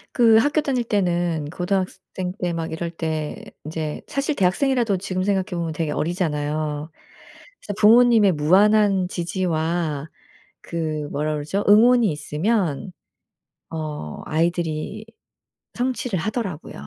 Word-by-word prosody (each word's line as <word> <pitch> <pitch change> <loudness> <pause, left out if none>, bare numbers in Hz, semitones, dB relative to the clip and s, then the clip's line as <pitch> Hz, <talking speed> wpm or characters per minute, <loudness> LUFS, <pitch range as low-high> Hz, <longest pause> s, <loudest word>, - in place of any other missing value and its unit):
그 230 -3 +5
학교 290 +6 +2
다닐 260 -4 0
때는 175 -7 0
고등학생 185 0 -3
때 175 -1 -1
막 165 -1 -4
이럴 170 +1 -3
때 160 -2 -3 0.3
이제 155 -1 -4
사실 280 +2 -1
대학생이라도 230 +2 +2
지금 185 0 -3
생각해 195 -1 +1
보면 165 -1 -2
되게 155 -1 -2
어리잖아요. 155 -2 -2 0.7
그래서 205 - -6
부모님의 225 -2 +6
무한한 195 +4 +4
지지와 165 -4 -2 0.5
그 155 -3 -3
뭐라 150 +2 -1
그러죠? 155 +7 -2
응원이 230 +1 +6
있으면 165 +3 -1 0.8
어 150 - -5
아이들이 170 +5 -1 0.7
성취를 245 -5 -1
하더라고요. 195 -4 -4
175 Hz, 275 characters per minute, -22 LUFS, 155-210 Hz, 0.8 s, 부모님의